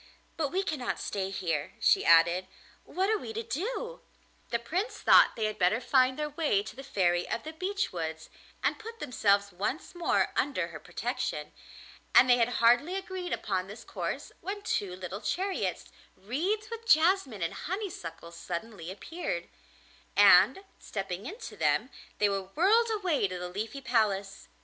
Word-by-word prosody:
But 315 -3 0
we 380 +2 0
cannot 295 -9 -2
stay 195 -1 -3
here,' 165 -6 -2
she - - +4
added; 170 +2 +5 0.4
'what 380 +2 -1
are 435 - +2
we 445 - -7
to 455 +1 -3
do?' 475 - -4 0.5
The 235 - +1
Prince 350 - -3
thought - - +6
they 220 - -1
had 215 0 -3
better 185 +5 +3
find 255 +1 +3
their 300 0 -2
way 290 -10 +1
to 190 - -9
the 270 - -8
Fairy 180 -9 +1
of 230 - -2
the 315 - -7
Beech 390 - -2
Woods 160 -2 -5 0.3
and - - +1
put 455 +1 -9
themselves 200 -4 +2
once 205 - -3
more 345 -1 +1
under 285 - 0
her - - -8
protection, - - -3 0.6
and - - +8
they 245 -1 +6
had 235 0 +3
hardly 245 +10 +5
agreed 375 -2 -5
upon 190 -2 -1
this 215 +4 -10
course - - -4
when 405 +3 -5
two 190 - -1
little 185 +2 -6
chariots 370 - -2 0.3
wreathed 375 - -2
with 460 0 -7
jasmine 315 - +4
and 165 - -2
honeysuckle 305 - -5
suddenly 175 +1 -6
appeared, 195 - -5 0.7
and, 385 - +7 0.2
stepping 195 +1 -5
into 420 +9 -8
them, - - +1 0.3
they 210 - +3
were 195 -1 0
whirled 400 - +3
away 370 - +1
to 185 -1 -5
the 180 0 -5
Leafy 215 +8 -5
Palace. 205 -6 0
240 Hz, 165 wpm, -29 LUFS, -, 0.7 s, and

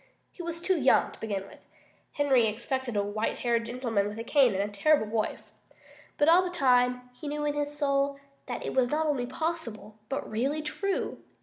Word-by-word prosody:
He - - -9
was 340 -1 -4
too 360 0 +1
young, 260 -1 +4
to - - -15
begin 200 -3 -3
with. - - -15 0.5
Henry 270 -6 +3
expected 245 +3 -3
a 200 - +2
white 210 +2 -2
haired 235 -1 +1
gentleman 230 -4 -1
with 210 +1 -6
a 230 - -4
cane 255 -4 +4
and 195 - +1
a 205 - -11
terrible 290 +3 +3
voice. 215 0 -3 0.6
But 290 - +3
all 340 +3 +7
the 365 - -2
time, 250 -5 +2
he 295 +4 -9
knew 295 +1 -2
in 295 - +1
his 295 0 -2
soul 280 -1 +1 0.3
that 245 - -4
it - - -3
was 255 -2 +3
not 310 +3 +1
only 275 -5 0
possible, 250 -8 -4
but 275 - -3
really 275 +8 -1
true. 390 +6 -2
260 Hz, 200 wpm, -28 LUFS, 230-295 Hz, 0.6 s, all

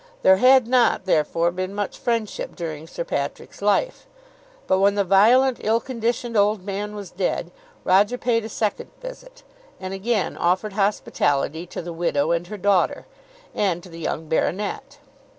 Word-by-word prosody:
There 190 0 +6
had 255 +1 +5
not, 245 -6 +3
therefore, 165 0 +1
been 185 +2 -4
much 205 -1 -3
friendship 230 -3 -3
during 160 -3 -6
Sir 170 - -5
Patrick's 140 +3 -5
life. 210 - 0 0.6
But 190 - +2
when 200 +1 +3
the 200 - +2
violent 235 +7 +4
ill 225 +2 +2
conditioned 235 -1 -3
old 205 -1 +2
man 205 +1 -4
was 200 -4 -8
dead, 180 -2 -2 0.3
Roger 205 +6 +3
paid 235 -2 0
a 220 - -6
second 210 -1 -2
visit, - - -11 0.4
and 185 0 -5
again 205 +1 -1
offered 185 +4 0
hospitality 170 -6 0
to 175 - -6
the 170 0 -6
widow 165 -2 0
and 170 +1 -1
her 210 - -7
daughter, 200 -1 +1 0.5
and 180 -4 0
to 185 - -12
the 165 0 -10
young 160 0 -3
baronet. 205 - -2
200 Hz, 160 wpm, -23 LUFS, 175-230 Hz, 0.6 s, There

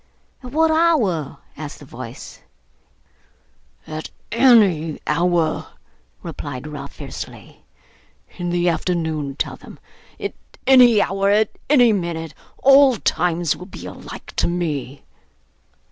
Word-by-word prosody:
'At 250 -1 -9
what 320 +2 +3
hour?' 250 - +2 0.2
asked 150 0 -7
the 145 - -13
voice. 125 -2 -9 1.5
'At 155 0 -6 0.2
any 210 - +4
hour,' 170 +1 +1 0.6
replied 130 +2 -6
Ralph 150 -1 -8
fiercely. - - -9 0.8
'In 175 0 -2
the 175 0 +1
afternoon, 160 -5 -1
tell - - -3
them. - - -13 0.4
At - - -4 0.3
any 245 -5 +7
hour, 195 0 0
at 210 +1 +2
any 245 -6 +6
minute. 165 -4 -3 0.3
All 275 -1 +7
times 175 -4 0
will 180 - -10
be - - -10
alike - - -10
to - - +2
me. 150 -6 -3
175 Hz, 115 wpm, -21 LUFS, 155-230 Hz, 1.5 s, any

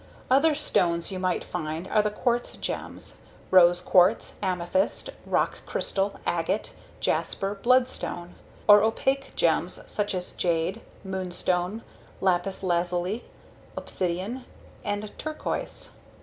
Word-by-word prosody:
Other 295 +4 +5
stones 175 - +1
you 185 - -4
might 185 -1 0
find 160 +1 -4
are 215 - +3
the 210 - 0
quartz 240 +3 -1
gems: - - -5 0.3
rose 175 -1 +7
quartz, 185 +4 +3
amethyst, 185 - 0 0.2
rock - - +1
crystal, 195 +1 0
agate, 175 +5 -1 0.3
jasper, 195 +1 0
bloodstone. 235 -6 +1 0.3
Or 205 0 +9
opaque 270 +5 0
gems - - +1
such 205 -1 -2
as 180 0 -3
jade, 175 +5 0 0.2
moonstone, 185 +1 -1 0.4
lapis 190 +1 0
lazuli, 180 +4 0 0.5
obsidian, 190 +8 -2 0.4
and 205 0 -3
turquoise. 310 0 -4
190 Hz, 105 wpm, -27 LUFS, 175-215 Hz, 0.5 s, Or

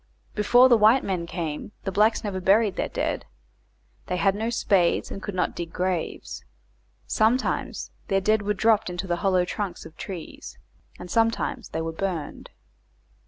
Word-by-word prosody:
Before 245 +4 +5
the 240 -3 +5
white 220 +5 +5
men 180 -3 -2
came 165 +2 -5
the 195 - -2
blacks 215 +4 +3
never 195 -3 -3
buried 200 +2 +3
their - - -2
dead; - - -2 0.8
they 180 - -1
had 195 +1 +3
no 220 +3 -2
spades 195 -7 +1
and 195 - -6
could 205 -1 -5
not 180 - 0
dig 170 -1 -5
graves. 180 -2 -3 0.6
Sometimes 230 +4 0 0.2
their 195 - +2
dead 215 +2 +2
were 205 0 -1
dropped 215 -1 +3
into 180 +2 -4
the 175 -2 -1
hollow 185 -1 +2
trunks 200 +1 -4
of 160 - -12
trees, 180 -3 -8 0.4
and 180 -1 -9
sometimes 230 0 0
they 160 - -3
were 165 0 -3
burned. 170 -4 -4
195 Hz, 165 wpm, -25 LUFS, 180-215 Hz, 0.8 s, Before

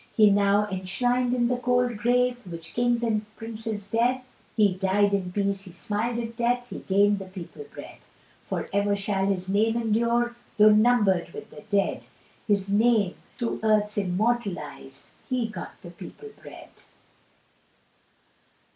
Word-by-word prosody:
He's 210 -2 +6
now 200 +1 +3
enshrin'd 245 +7 0
in 245 -1 +2
the 250 0 0
cold 245 -1 +1
grave, 245 +2 +2
Which 165 -1 -8
Kings 240 0 +1
and 220 -2 +1
princes 220 -2 -6
dread; 245 +3 +2 0.4
He 205 -3 +4
died 195 +2 +2
in 185 -2 -1
peace, 200 0 -1
he 185 - -10
smil'd 210 +7 -2
at 230 -1 -5
death, 245 +1 0
"He'd - - -8
gained 200 +1 +3
the 195 - -7
people 185 - -9
bread." - - -10 0.4
For - - -4
ever 200 0 +2
shall 195 -1 -1
his 185 -2 -1
name 220 +4 +2
endure, 235 +2 +1 0.2
Tho' 215 0 +7
numbered 210 -5 +3
with - - -9
the - - -11
dead, 200 -1 +1 0.5
His 200 -2 +1
name 215 -3 +3 0.2
through 235 -2 -2
earth's 215 -1 +2
immortalised, 180 - -2 0.2
"He 250 -3 0
got 215 - -8
the 175 - -9
people 190 - -11
bread." - - -12
210 Hz, 145 wpm, -26 LUFS, 195-235 Hz, 0.5 s, Tho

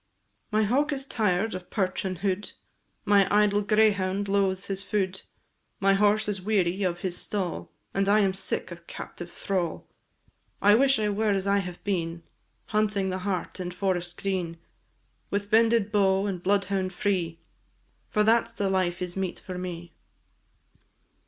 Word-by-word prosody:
My 215 0 +2
hawk 275 +8 +2
is 270 -2 -2
tired 215 -4 0
of 185 -1 -7
perch 190 -2 -1
and 185 -1 -2
hood, 195 +2 -2 0.5
My 200 -2 +5
idle 205 0 +4
greyhound 200 -2 +2
loathes 195 -1 +1
his 195 -1 -3
food, 190 -2 -1 0.6
My 195 0 +4
horse 210 +2 +3
is 200 -2 -2
weary 190 -2 +1
of 175 -2 -1
his 185 -2 -2
stall, 180 - -3 0.2
And 195 0 +1
I 210 +1 +5
am 195 -2 +2
sick 190 -1 -3
of 170 0 -10
captive 175 0 -8
thrall; 180 -4 -2 0.7
I 205 +1 +6
wish 270 +4 +5
I 210 -1 +1
were 210 +1 0
as 195 -1 +1
I 200 0 +3
have 180 -2 -6
been, 170 -4 -2 0.5
Hunting 210 -3 +1
the 185 - -2
hart 185 -1 -3
in 180 -1 -3
forest 180 -1 -2
green, 180 -4 -2 0.7
With 200 +1 -2
bended 225 -1 +4
bow 195 -1 +3
and 190 -4 -3
bloodhound 195 -1 0
free, 180 -5 0 0.7
For 210 - +2
that 230 +2 +4
's - - -20
the 200 -4 -1
life 185 -1 0
is 175 -1 -4
meet 190 -2 -2
for 180 -1 -7
me. 175 -2 -6
195 Hz, 160 wpm, -27 LUFS, 185-210 Hz, 0.7 s, I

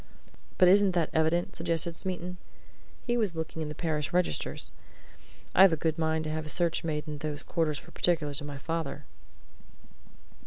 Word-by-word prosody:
"But 180 - +6
isn't 195 0 +6
that 170 -3 +1
evident?" 160 +2 +1
suggested 165 0 -1
Smeaton. 180 0 -4 0.7
"He 240 0 0
was 210 -7 +1
looking 160 0 -4
in 155 - -3
the 150 - -6
parish 155 -2 -1
registers. 180 0 -1 0.8
I've 190 -1 +8
a - - +1
good 160 +1 -1
mind 160 0 +1
to 155 - -3
have 155 0 -3
a - - -3
search 170 +1 +1
made 150 -2 -2
in 150 -1 -5
those 150 0 -3
quarters 160 -3 0
for - - -12
particulars 150 -4 0
of 145 - -6
my 145 -1 -6
father." 160 -1 -3
160 Hz, 170 wpm, -29 LUFS, 150-175 Hz, 0.8 s, I've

